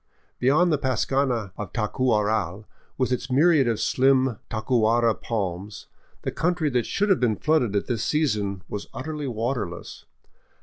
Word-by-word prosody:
Beyond 155 +8 +3
the 150 - +1
pascana 130 -4 0
of 95 -3 -6
Tacuaral, 105 -4 0 0.3
with 130 -1 0
its 125 +1 -2
myriad 145 0 +4
of 115 -2 0
slim 130 -3 +2
tacuara 115 0 +2
palms, 100 -2 -4 0.4
the - - -2
country 170 -3 0
that 125 -3 0
should 205 +1 0
have 195 - +4
been 115 -4 +2
flooded 125 -6 +1
at 100 - 0
this 115 -3 -2
sea 155 +6 +2
son 100 -6 -2
was 105 - -6
utterly 150 +3 -4
waterless. 115 -6 -4
120 Hz, 145 wpm, -25 LUFS, 105-135 Hz, 0.4 s, myriad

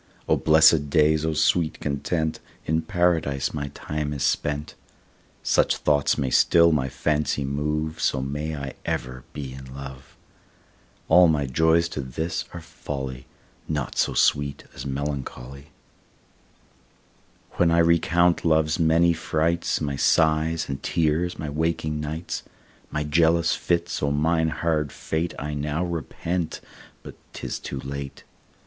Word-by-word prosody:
O - - +4
blessed 80 -1 +5
days, 75 +1 +3
O 80 - 0
sweet 80 +1 +1
content, 80 +3 -2 0.3
In 80 +1 +1
Paradise 80 -5 0
my 70 -2 -3
time 75 -1 -3
is 70 - -3
spent. 75 +1 -1 0.7
Such - - +2
thoughts 70 -2 +2
may 65 -2 -1
still 85 0 +5
my 65 -4 0
fancy 75 0 -1
move, 75 +3 -2
So - - +1
may 75 +4 -3
I 70 -3 -5
ever 65 0 -4
be 70 -3 -6
in 65 -1 -10
love. 65 -2 -10 0.9
All 90 +2 +7
my 75 -3 +1
joys 80 +5 +3
to 75 - -4
this 80 +6 -3
are 85 - -8
folly, 65 -6 -6 0.4
Naught 75 -4 -3
so - - +1
sweet 70 -1 +2
as - - -7
melancholy. 70 -1 -5 1.9
When 85 - +4
I 85 - +3
recount 85 +1 +3
love's 80 0 +2
many 85 +1 +4
frights, 80 +1 0
My 70 -2 -2
sighs 80 +1 +2
and 70 -1 -5
tears, 85 +2 0
my 80 - -5
waking 75 0 -1
nights, 80 +3 -4 0.5
My 75 - -2
jealous 85 +2 +3
fits; 85 0 -1
O 70 - +1
mine 80 +3 +1
hard 75 -3 -1
fate 80 +2 -3
I 75 +1 -4
now 75 +4 -2
repent, 85 +1 -3 0.4
but - - -9 0.2
'tis - - -5
too 70 - -6
late. 70 0 -7
75 Hz, 135 wpm, -24 LUFS, 70-80 Hz, 1.9 s, All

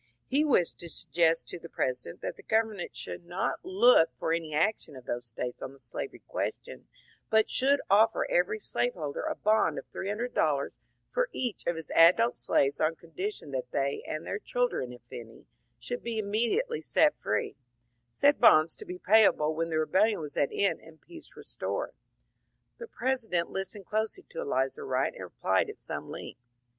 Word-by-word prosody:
He 280 +3 +2
wished 250 - +2
to 170 - -5
suggest 165 +2 +1
to - - -6
the 170 - -11
President 125 -9 -3
that - - -4
the - - -14
government 220 -4 -1
should - - -5
not 175 +2 -2
look 195 -2 +5
for 165 - 0
any 165 -2 -2
action 155 -1 0
of 130 -1 -11
those 120 0 -4
States 120 +2 -5
on 135 - -6
the 140 - -18
slavery 120 -3 -7
question, - - -4 0.4
but 220 0 +3
should 280 +2 +3
ofiEer 220 +3 +5
every 180 +4 +1
slave 245 +3 -1
holder 150 -5 -4
a - - -2
bond 215 +1 +2
of - - -5
three 195 - -5
hundred 235 +4 -3
dollars 140 -3 0 0.3
for - - 0
each 245 - -3
of 170 - +1
his 160 -2 -7
adult 185 +8 +6
slaves 140 0 +1
on 155 +1 +2
condition 170 -1 -5
that 130 -2 -3
they 140 0 -1
and 155 +1 -4
their 200 - -3
children, 245 - -1
if 125 - -12
any, 115 -1 -10 0.3
should 245 - -4
be 230 -1 -4
immediately 235 - 0
set 305 -1 +3
free; 105 - -1 0.5
said 285 - +3
bonds 160 -8 +6
to - - -9
be 180 - -6
payable 190 -7 +4
when 165 +1 -2
the 160 - 0
rebellion 195 +7 +2
was 150 -3 -7
at 140 - +2
an - - -7
end 200 - +1
and 160 -1 -16
peace 335 -2 -12
restored. - - -4 0.9
The 470 - -7
President 230 - -1
listened 195 +1 -4
closely 220 - -2
to - - -7
Elizur 460 0 -1
Wright 425 - 0
and - - -8
replied 465 - 0
at. 425 - -8
some - - -6
length. 125 - -8
185 Hz, 185 wpm, -29 LUFS, 155-230 Hz, 0.9 s, adult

